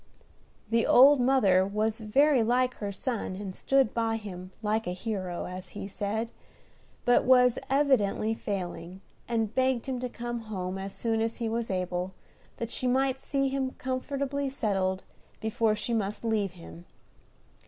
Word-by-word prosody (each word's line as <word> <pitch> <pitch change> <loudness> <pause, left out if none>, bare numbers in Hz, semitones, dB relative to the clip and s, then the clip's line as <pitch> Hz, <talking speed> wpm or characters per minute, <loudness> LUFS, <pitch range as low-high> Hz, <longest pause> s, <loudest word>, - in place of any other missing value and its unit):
The 230 0 +3
old 275 +2 +8
mother 215 -8 +4
was 215 +3 -1
very 265 +5 +3
like 250 +3 +2
her 205 -1 -3
son, 210 -1 -3
and 195 -1 -6
stood 270 +3 +2
by 225 -1 0
him 185 -4 -8
"like 215 0 0
a 180 - -1
hero," 185 -3 -4
as 185 0 -7
he - - -4
said, 215 +3 -3 0.7
but 245 - +5
was 250 -1 +5
evidently 255 -6 +2
failing, 185 -3 -5 0.3
and 225 -2 -1
begged 260 -2 +1
him 260 -2 -3
to 250 0 -3
come 240 0 -4
home 195 -4 -4
as 195 0 -6
soon 225 -1 0
as 225 0 -1
he 235 - -2
was 230 +1 -2
able, 180 0 -2 0.4
that 230 -1 -4
she 255 - -1
might 265 +1 +1
see 275 -1 0
him 265 -1 -2
comfortably 275 +2 -2
settled 195 -7 -1 0.4
before 220 0 +1
she 215 +3 -3
must 215 0 -2
leave 210 -4 0
him. 170 -1 -12
225 Hz, 155 wpm, -28 LUFS, 195-255 Hz, 0.7 s, old